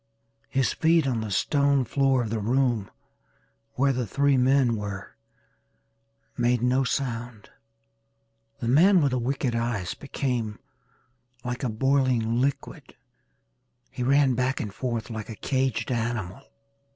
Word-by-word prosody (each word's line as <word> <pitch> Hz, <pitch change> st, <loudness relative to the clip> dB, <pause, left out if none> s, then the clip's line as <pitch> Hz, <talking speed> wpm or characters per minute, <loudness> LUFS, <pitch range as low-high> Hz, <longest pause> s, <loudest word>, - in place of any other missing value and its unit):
His 135 Hz, -1 st, +1 dB
feet 160 Hz, -1 st, +3 dB
on 125 Hz, -4 st, 0 dB
the 110 Hz, -, -4 dB
stone 140 Hz, +6 st, +2 dB
floor 135 Hz, -2 st, +2 dB
of 110 Hz, -, -5 dB
the 115 Hz, -, -1 dB
room 120 Hz, -2 st, 0 dB, 0.8 s
where 135 Hz, +1 st, +2 dB
the 125 Hz, -2 st, -2 dB
three 140 Hz, +6 st, +2 dB
men 130 Hz, -2 st, +3 dB
were 100 Hz, -2 st, -6 dB, 1.2 s
made 120 Hz, 0 st, +1 dB
no 130 Hz, +2 st, +2 dB
sound. 120 Hz, -4 st, -4 dB, 1.1 s
The 115 Hz, -, -2 dB
man 170 Hz, +7 st, +5 dB
with 140 Hz, -, +2 dB
the 130 Hz, -, 0 dB
wicked 130 Hz, +1 st, -1 dB
eyes 115 Hz, -6 st, -2 dB
became 125 Hz, -6 st, -3 dB, 0.9 s
like 125 Hz, 0 st, -4 dB
a 125 Hz, -, 0 dB
boiling 125 Hz, -1 st, +1 dB
liquid 140 Hz, +1 st, -3 dB, 1.0 s
he -, -, -7 dB
ran 135 Hz, +1 st, +3 dB
back 130 Hz, +2 st, 0 dB
and 105 Hz, -4 st, -4 dB
forth 120 Hz, -1 st, -3 dB
like 110 Hz, -1 st, -6 dB
a 110 Hz, -, -6 dB
caged 130 Hz, -2 st, -1 dB
animal. 115 Hz, -3 st, -3 dB
125 Hz, 130 wpm, -26 LUFS, 115-135 Hz, 1.2 s, man